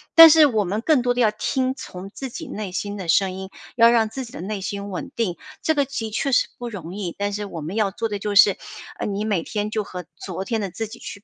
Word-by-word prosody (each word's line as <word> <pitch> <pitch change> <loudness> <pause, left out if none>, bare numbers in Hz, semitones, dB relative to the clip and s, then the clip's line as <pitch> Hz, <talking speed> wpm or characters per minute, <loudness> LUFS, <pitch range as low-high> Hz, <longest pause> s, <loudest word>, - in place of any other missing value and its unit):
但 330 0 +12
是 315 0 +8
我 220 -6 +1
们 205 +5 -2
更 295 +1 +3
多 245 0 +1
的 245 - 0
要 220 -3 +4
听 255 +4 -1
从 190 -7 -8
自 265 +6 -7
己 - - -7
内 205 -3 -5
心 205 +3 -3
的 185 -3 -6
声 190 +3 +3
音， 190 +1 -7 0.3
要 230 0 +8
让 230 -2 +3
自 260 +4 -5
己 235 - -13
的 - - -7
内 200 +2 -3
心 200 +1 -4
稳 185 - -5
定， 195 -8 -1 0.2
这 315 - +2
个 285 -2 +2
的 235 -5 -4
确 275 +6 -1
是 - - +4
不 245 - -5
容 185 -7 -7
易。 190 -4 -4
但 205 0 -1
是 205 +1 -3
我 170 -5 -7
们 160 +6 -5
要 210 -3 +2
做 225 +3 -3
的 205 -1 -3
就 205 0 -3
是， 200 -1 +7 0.4
呃， - - -2
你 205 0 -2
每 205 -6 0
天 210 0 -3
就 215 -1 -1
和 180 -2 -7
昨 185 0 -5
天 220 +3 -1
的 200 -2 -2
自 225 +5 -4
己 235 +2 -10
去 205 -1 -9
210 Hz, 295 characters per minute, -23 LUFS, 195-235 Hz, 0.4 s, 但